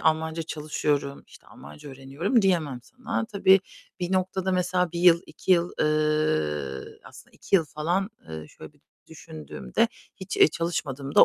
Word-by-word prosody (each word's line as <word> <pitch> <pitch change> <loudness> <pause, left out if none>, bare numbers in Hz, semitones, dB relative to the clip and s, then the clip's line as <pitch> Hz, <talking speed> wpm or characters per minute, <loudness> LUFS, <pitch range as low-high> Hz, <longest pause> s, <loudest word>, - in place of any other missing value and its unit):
Almanca 160 +1 +1
çalışıyorum, 150 -2 -2
işte, - - -18
Almanca 75 - -12
öğreniyorum 140 - 0
diyemem 160 -9 +1
sana. 255 - -4
Tabii 195 -3 +4 0.4
bir 180 +1 -2
noktada 190 0 0
mesela 180 -1 +1
1 170 - -3
yıl 175 -1 +6
2 190 - 0
yıl, 175 0 +2
ııı, 150 - 0
aslında - - -14
2 195 - +2
yıl 165 - +2
falan, 175 +7 -1 0.2
ııı, 80 -1 -7
şöyle - - -13
bir - - -29 0.3
düşündüğümde 70 -5 -3 0.3
hiç, 190 +1 -6
eee, - - +7
çalışmadığım 145 -4 -3
da - - +9
160 Hz, 150 wpm, -26 LUFS, 140-185 Hz, 0.4 s, da